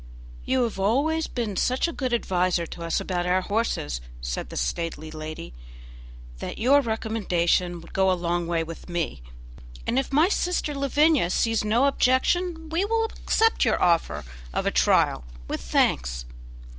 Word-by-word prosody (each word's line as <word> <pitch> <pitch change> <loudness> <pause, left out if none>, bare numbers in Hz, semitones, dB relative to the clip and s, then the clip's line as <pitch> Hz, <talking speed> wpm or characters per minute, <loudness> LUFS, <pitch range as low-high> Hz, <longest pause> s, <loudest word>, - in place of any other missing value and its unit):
"You 260 -1 +2
have 225 -4 -3
always 285 +11 +1
been 225 -5 -3
such 255 - +1
a - - -3
good 260 -3 -2
adviser 180 -6 +1
to 170 - -9
us 165 - 0
about 180 -1 -2
our 185 +1 +2
horses," 185 - -1 0.2
said - - -4
the - - -7
stately 155 - -3
lady, 155 - -7 0.9
"that - - -5
your 275 +6 +5
recommendation 185 -7 0
would 170 - -14
go 190 0 +3
a - - +4
long 175 0 -1
way 165 -1 0
with 165 +2 -9
me, 170 - -2 0.6
and 245 - +1
if 270 - -3
my 300 +5 +5
sister 360 -6 0
Lavinia 280 - +3
sees 225 +3 +1
no 225 +5 +3
objection 325 +6 +1
we 335 +4 +1
will 450 +2 +1 0.2
accept 450 0 +3
your - - +2
offer 170 - +1 0.3
of - - -2
a - - +2
trial, - - +3 0.2
with - - -3
thanks." - - +1
210 Hz, 160 wpm, -25 LUFS, 170-275 Hz, 0.9 s, your